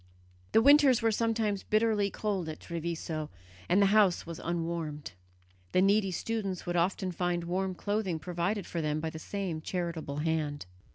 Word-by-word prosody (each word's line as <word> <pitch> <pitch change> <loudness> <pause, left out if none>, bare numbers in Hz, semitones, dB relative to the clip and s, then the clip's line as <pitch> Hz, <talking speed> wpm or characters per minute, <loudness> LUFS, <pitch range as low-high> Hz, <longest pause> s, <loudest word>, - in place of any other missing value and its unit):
The 225 - +6
winters 280 -4 +6
were 225 - +4
sometimes 220 -2 0
bitterly 215 -2 +2
cold 195 -6 -2
at 155 - -6
Treviso, 165 -2 -4 0.4
and 180 - +4
the 200 - +6
house 205 -5 +4
was 170 -1 -7
unwarmed. 165 -4 -3 0.6
The 185 - +4
needy 200 0 +3
students 195 0 -3
would 175 - -2
often 185 +2 +1
find 175 0 -1
warm 185 +2 -1
clothing 205 -3 -1
provided 180 +4 -2
for 170 - -3
them 150 0 -1
by 160 0 -3
the 160 - -7
same 180 -3 -4
charitable 170 -4 -3
hand. 150 -2 -1
180 Hz, 160 wpm, -30 LUFS, 165-205 Hz, 0.6 s, The